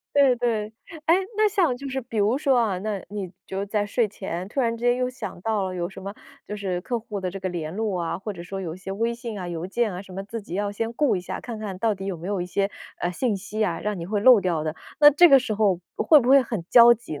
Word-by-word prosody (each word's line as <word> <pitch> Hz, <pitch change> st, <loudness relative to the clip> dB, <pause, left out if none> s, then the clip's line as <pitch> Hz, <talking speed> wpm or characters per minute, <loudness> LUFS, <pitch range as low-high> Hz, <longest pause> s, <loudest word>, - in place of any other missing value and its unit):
对 270 Hz, -3 st, +5 dB
对。 220 Hz, -3 st, -1 dB, 0.3 s
诶， 330 Hz, -, +6 dB, 0.2 s
那 430 Hz, 0 st, +5 dB
像 365 Hz, -, +2 dB
就 275 Hz, +2 st, -7 dB
是 265 Hz, 0 st, -2 dB
比 225 Hz, -2 st, -5 dB
如 210 Hz, +5 st, +3 dB
说 275 Hz, -3 st, +2 dB
啊， 205 Hz, -6 st, +1 dB
那， 205 Hz, -1 st, -3 dB
你 200 Hz, -3 st, -5 dB, 0.2 s
就 190 Hz, -, -4 dB
是 200 Hz, -, -3 dB
在 205 Hz, 0 st, -1 dB
睡 230 Hz, +2 st, +1 dB
前 190 Hz, -3 st, -5 dB
突 275 Hz, -, -2 dB
然 230 Hz, -2 st, +1 dB
之 235 Hz, -, -7 dB
间 245 Hz, 0 st, +4 dB
又 250 Hz, 0 st, 0 dB
想 255 Hz, -8 st, -7 dB
到 215 Hz, -1 st, 0 dB
了 185 Hz, -1 st, -3 dB
有 175 Hz, -1 st, -2 dB
什 190 Hz, 0 st, -11 dB
么 200 Hz, +1 st, -6 dB, 0.3 s
就 210 Hz, -, -5 dB
是 190 Hz, -3 st, -3 dB
客 240 Hz, +2 st, -2 dB
户 210 Hz, -2 st, -6 dB
的 185 Hz, -1 st, -3 dB
这 195 Hz, +1 st, -7 dB
个 190 Hz, -, -2 dB
联 165 Hz, -1 st, -5 dB
络 210 Hz, -4 st, -1 dB
啊， 165 Hz, -, -2 dB
或 210 Hz, +2 st, -5 dB
者 170 Hz, -, -8 dB
说 195 Hz, +2 st, -6 dB
有 170 Hz, -3 st, -5 dB
一 -, -, -11 dB
些 190 Hz, +1 st, -7 dB
微 230 Hz, +3 st, -1 dB
信 235 Hz, -3 st, -6 dB
啊、 180 Hz, -, -5 dB
邮 170 Hz, 0 st, -4 dB
件 215 Hz, +2 st, 0 dB
啊 180 Hz, -, -6 dB
什 190 Hz, -, -14 dB
么， 195 Hz, -, -5 dB
自 225 Hz, +1 st, -6 dB
己 185 Hz, -, -12 dB
要 205 Hz, +1 st, -1 dB
先 225 Hz, +3 st, -3 dB
顾 280 Hz, -3 st, +2 dB
一 180 Hz, -, -3 dB
下， 180 Hz, -, -6 dB
看 230 Hz, -3 st, -7 dB
看 200 Hz, -4 st, -5 dB
到 220 Hz, 0 st, +1 dB
底 195 Hz, 0 st, -8 dB
有 195 Hz, -2 st, -3 dB
没 175 Hz, -, -7 dB
有 200 Hz, -3 st, -1 dB
一 -, -, -5 dB
些， 195 Hz, +2 st, -1 dB, 0.3 s
呃， 175 Hz, -, -1 dB
信 210 Hz, +3 st, -1 dB
息 215 Hz, +3 st, -2 dB
啊， 170 Hz, -4 st, -2 dB
让 210 Hz, -3 st, -2 dB
你 170 Hz, -, -5 dB
会 205 Hz, +2 st, -1 dB
漏 250 Hz, +1 st, +8 dB
掉 170 Hz, -5 st, -1 dB
的。 155 Hz, 0 st, -3 dB, 0.2 s
那 295 Hz, 0 st, +10 dB
这 345 Hz, +5 st, +7 dB
个 275 Hz, -, +9 dB
时 245 Hz, -4 st, -2 dB
候 200 Hz, -4 st, +2 dB, 0.2 s
会 305 Hz, -3 st, +6 dB
不 245 Hz, -, -2 dB
会 275 Hz, 0 st, +7 dB
很 225 Hz, -7 st, -4 dB
焦 240 Hz, -1 st, +8 dB
急 225 Hz, -9 st, -5 dB
呢， -, -, -10 dB
210 Hz, 315 characters per minute, -24 LUFS, 185-235 Hz, 0.3 s, 那